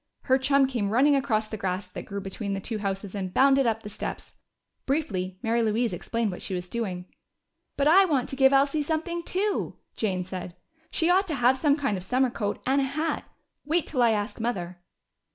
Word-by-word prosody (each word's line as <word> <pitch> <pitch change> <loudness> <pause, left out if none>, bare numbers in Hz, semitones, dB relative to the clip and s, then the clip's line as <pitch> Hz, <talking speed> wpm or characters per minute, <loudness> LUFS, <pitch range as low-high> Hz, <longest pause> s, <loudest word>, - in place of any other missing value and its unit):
Her 260 0 +2
chum 275 +1 +4
came 240 -6 -1
running 270 +7 +4
across 225 -6 +1
the 215 - -5
grass 185 -1 -2
that 185 - -8
grew 200 -1 -5
between 200 +1 -4
the - - -3
two 215 +2 -4
houses 195 -1 -3
and 190 -3 -3
bounded 270 +3 +4
up 225 -1 0
the 210 - -6
steps. - - -6 0.5
Briefly 190 -11 -1
Mary 230 +1 +2
Louise 225 0 +1
explained 225 +4 -2
what 180 - -7
she 190 - -4
was 180 0 -5
doing. 185 -6 -3 0.7
"But 280 - +2
I 380 +5 +7
want 280 -8 +1
to - - -4
give 265 0 +5
Elsie 275 +2 +3
something 320 +3 -2
too," 390 +4 -1 0.2
Jane 190 -4 -1
said. 180 -1 -7 0.3
"She 335 +2 +2
ought 385 +2 +3
to 315 - -2
have 250 0 +4
some 285 +1 +3
kind 275 -9 0
of 180 - -7
summer 250 +5 +1
coat 205 -3 -2
and 275 +2 +3
a - - +1
hat. 305 +5 -2 0.4
Wait 320 +3 +1
till 260 -5 -1
I 235 - +5
ask 215 +2 -1
Mother." 185 -7 -3
235 Hz, 205 wpm, -26 LUFS, 200-280 Hz, 0.7 s, I